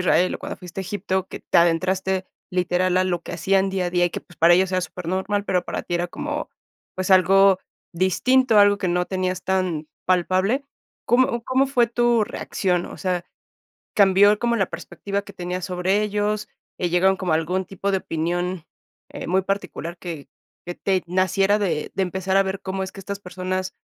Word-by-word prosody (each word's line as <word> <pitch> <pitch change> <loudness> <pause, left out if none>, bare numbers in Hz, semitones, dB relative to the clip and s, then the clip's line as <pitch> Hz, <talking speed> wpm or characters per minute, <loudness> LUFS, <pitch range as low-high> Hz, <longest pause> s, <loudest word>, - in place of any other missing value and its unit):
Israel 180 0 +3
o - - -5
cuando - - -6
fuiste 180 +1 -7
a - - -3
Egipto, 190 0 -2
que - - -8
te - - 0
adentraste 185 +3 +1 0.2
literal 180 0 +1
a 185 - +3
lo 175 -2 -1
que - - -8
hacían 190 +3 +1
día 190 -2 -1
a - - -3
día 175 0 +2
y - - -4
que, - - -5
pues, 175 - -20
para 165 +2 +6
ellos 190 +1 +2
era 185 - +2
supernormal, 190 +4 -2
pero 180 -1 +1
para - - -4
ti 175 - -4
era 175 +1 0
como, - - -4 0.5
pues, 185 +1 -2
algo 190 +1 +6 0.4
distinto, 225 +7 +3
algo 205 0 +6
que 185 - -1
no 180 0 0
tenías 185 -1 -2
tan 180 -5 -1 0.2
palpable, 185 +8 +1 0.4
¿cómo 240 -1 +2
cómo 260 +1 +2
fue 245 -3 +3
tu 240 -1 +2
reacción? 180 -3 -1
O - - -9
sea, 180 -2 -1 0.7
¿cambió 200 +1 +6
como 235 0 +1
la 195 -4 +1
perspectiva 200 0 -4
que 200 - -12
tenías 180 0 -4
sobre 185 +2 +1
ellos?, 210 0 -1 0.3
eh, 180 - 0
¿llegaron 190 +2 +3
como 185 -3 -1
a 155 - +4
algún 180 +4 -1
tipo 195 +1 -3
de 190 - +2
opinión, 175 +1 -2 0.5
eh, - - -7
muy 190 +2 +2
particular, 190 -3 -4
que 165 -5 -7 0.4
que 175 - -4
te 190 -2 0
naciera 190 +3 +2
de 160 -6 -1
de 195 - 0
empezar 190 +1 -1
a 195 - +6
ver 190 0 -4
cómo 190 0 -3
es 190 - -4
que - - -14
estas 200 +1 -6
personas, 185 0 -4
185 Hz, 195 wpm, -23 LUFS, 180-195 Hz, 0.7 s, para